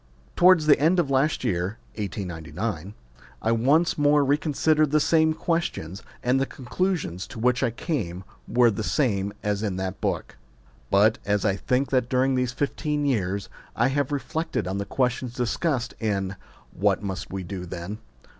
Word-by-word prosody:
Towards 180 -3 +6
the 150 - +6
end 165 +5 +3
of 145 -5 0
last 135 +3 +2
year 95 -1 -1 0.2
(1899) 95 -2 -4 0.4
I 115 - 0
once 145 +9 +3
more 145 0 +4
reconsidered 150 +1 +2
the 155 +2 +3
same 160 0 +3
questions, 135 - -2 0.2
and 125 +2 +2
the 135 - 0
conclusions 130 - -2
to - - -10
which 125 +2 +2
I 130 - +2
came 110 - -3 0.2
were 120 0 +4
the 100 - -4
same 105 -5 0
as 105 -1 0
in 100 -4 -1
that 95 0 -4
book. - - -2 0.5
But, 105 +3 +4
as 105 +1 0
I 100 -2 +2
think 125 +7 0
that 125 -2 +1
during 130 +1 +2
these 125 -1 0
fifteen 145 +3 -1
years 100 -7 0 0.3
I 120 +3 +3
have 145 0 0
re 145 - +1
flected 135 - -3
on 95 +1 -2
the 100 - -2
questions 125 0 -1
discussed 125 +1 -1
in 100 -3 -1 0.4
What 100 +1 +1
Must 95 -3 -4
We 95 0 -4
Do 90 0 -6
Then 85 +5 -6
120 Hz, 165 wpm, -25 LUFS, 100-145 Hz, 0.5 s, Towards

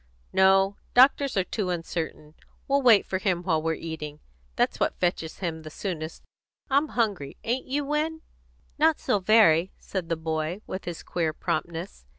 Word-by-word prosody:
"No; 195 +1 +4 0.2
doctors 265 -1 +5
are 190 - +3
too 190 0 -3
uncertain. 165 -3 -4 0.3
We'll 280 0 +2
wait 235 -6 +6
for 190 - -2
him 185 -4 0
while 160 -4 +1
we're 160 0 0
eating. 155 -2 -6 0.4
That's - - +1
what - - 0
fetches 175 -3 -1
him 165 -4 -4
the 155 - -9
soonest. 160 -1 -5 0.5
I'm 285 +3 +3
hungry. 200 - -1
Ain't 245 +3 -2
you, 285 +2 -1
Win?" 310 +2 -1 0.6
"Not 315 0 +4
so 205 - +1
very," 190 -4 +4
said 185 -4 -5
the 165 - 0
boy, 160 +3 -3
with 185 - -6
his 175 -2 -6
queer 165 -3 -1
promptness. 170 - -4
185 Hz, 165 wpm, -26 LUFS, 160-225 Hz, 0.6 s, wait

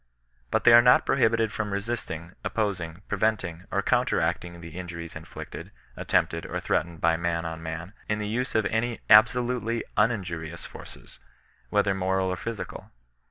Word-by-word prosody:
But - - +1
they 115 - +8
are 120 - +10
not 125 +1 +5
prohibited 115 -4 +2
from 105 -2 -3
resisting, 100 -5 -4
op - - -4
posing^ 95 -6 -2
preventing, 95 -4 -1
or - - 0
counteracting 85 -1 0
the 85 -1 -9
injuries 85 -2 -7
inflicted, 80 0 -8 0.3
attempted, - - 0
or - - -3
threatened 85 +1 -1
by 85 0 +3
man 85 0 -1
on 80 0 -5
man, 80 +4 -6 0.2
in 105 - +1
the 105 -1 -3
use 125 +4 -2
of 110 -2 +3
JUiy 115 +2 -1
ataolutely 120 +1 +4 0.2
uninjurious 90 -7 -1
forces, - - -12 0.5
whether 100 -1 +2
moral 95 0 0
or 90 - -1
phy 115 - -5
cdoJ. 115 - -7
100 Hz, 160 wpm, -27 LUFS, 85-110 Hz, 0.5 s, are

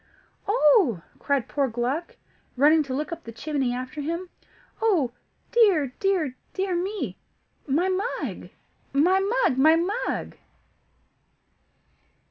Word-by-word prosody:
"Oh!" 300 - +4 0.2
cried 280 -4 0
poor 280 -2 0
Gluck, 250 +8 -3 0.4
running 305 +4 +5
to 265 - -5
look 300 +4 -3
up 335 0 -6
the 230 - -8
chimney 270 +1 -2
after 255 +4 -5
him; 335 +5 -4 0.5
"oh 360 - +2 0.4
dear, 370 - +4
dear, 360 -9 0 0.2
dear 380 -1 -1
me! 385 +4 -3 0.5
My 310 +7 +2
mug! 385 +6 -3 0.4
my 350 +7 +4
mug! 400 - +1
my 315 +4 +6
mug!" 385 +8 -2
315 Hz, 110 wpm, -25 LUFS, 270-380 Hz, 0.5 s, my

